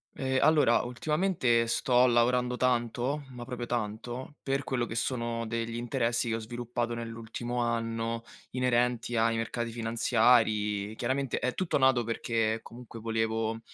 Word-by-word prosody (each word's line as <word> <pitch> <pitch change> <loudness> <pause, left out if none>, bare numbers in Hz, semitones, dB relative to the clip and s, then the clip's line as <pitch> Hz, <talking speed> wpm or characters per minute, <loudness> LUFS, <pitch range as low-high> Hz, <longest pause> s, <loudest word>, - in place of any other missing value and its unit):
Ehm, 130 -1 0
allora 150 -7 +5
ultimamente 125 -2 +1
sto 125 +1 +3
lavorando 125 +1 +2
tanto, 125 +3 0
ma 120 -1 -8
proprio 120 -1 -5
tanto, 120 +4 -4
per 135 0 -1
quello 125 -2 -1
che 115 - -6
sono 115 -1 -1
degli 115 0 -3
interessi 120 -1 0
che 110 - 0
ho - - -2
sviluppato 120 +1 -3
nell'ultimo 115 +1 -5
anno 115 -1 -1 0.3
inerenti 125 -1 +1
ai 115 0 +3
mercati 115 +1 -2
finanziari. 110 -3 +2
Chiaramente 130 +3 -1
è 125 - -1
tutto 185 -3 0
nato 130 -3 +4
perché 115 -1 0
comunque 120 -1 -10
volevo, 115 0 -1
120 Hz, 135 wpm, -29 LUFS, 115-125 Hz, 0.3 s, allora